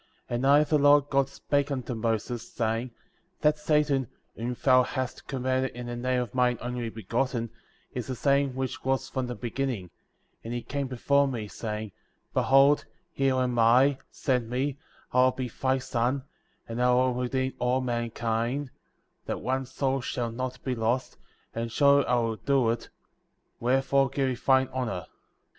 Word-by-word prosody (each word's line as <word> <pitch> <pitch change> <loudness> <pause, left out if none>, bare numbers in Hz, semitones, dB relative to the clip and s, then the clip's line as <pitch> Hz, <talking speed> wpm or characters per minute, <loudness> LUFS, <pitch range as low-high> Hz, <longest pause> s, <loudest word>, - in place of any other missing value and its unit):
And 120 +2 0
I, 145 +2 +6
the 150 0 +2
Lord 145 0 +5
God, 135 -1 +3
spake^ 140 +1 -1
unto 130 -3 -3
Moses, 115 +1 -2
saying: 115 +1 -1 0.5
That 150 0 +3
Satan,^ 150 -4 +2 0.3
whom 120 +2 -3
thou 130 -2 +5
hast 130 0 -4
commanded 130 -1 -1
in 125 0 -6
the 120 0 -4
name 125 +1 0
of 115 - -10
mine 125 -1 +2
Only 120 -1 -3
Begotten,^ 115 +2 -2 0.4
is 125 -3 -4
the 130 - -3
same 140 0 +2
which 130 -1 -3
was 135 0 0
from 130 -2 -2
the 125 - -4
beginning,^ 120 -5 -3 0.5
and 115 +2 -4
he 120 - -4
came 140 -1 -3
before 140 +3 +2
me, 115 -5 -4
saying 105 0 -5 0.2
— - - -46
Behold, 135 +2 +4 0.3
here 135 -1 +2
am 125 -2 0
I, 130 +4 +5
send 125 -4 -1
me, 135 +3 -1 0.3
I 125 +1 +5
will 130 - +4
be 130 -2 -4
thy 130 +3 0
son, 130 +1 -1 0.4
and 115 +1 -3
I 125 0 +4
will 130 0 +3
redeem 130 +1 -1
all 125 +1 +2
mankind, 120 +2 -2 0.6
that - - -3
one 130 0 -1
soul 135 0 -1
shall 120 -1 -2
not 130 +1 -5
be 130 - -1
lost, 120 +2 -1 0.4
and 115 0 -3
surely 140 +2 +4
I 125 - +3
will 115 -2 0
do 130 +1 +2
it; 115 0 -5 0.7
wherefore 135 +2 +2
give 135 0 0
me - - 0
thine 130 +1 +3
honor. 120 -8 -2
130 Hz, 170 wpm, -28 LUFS, 120-135 Hz, 0.7 s, I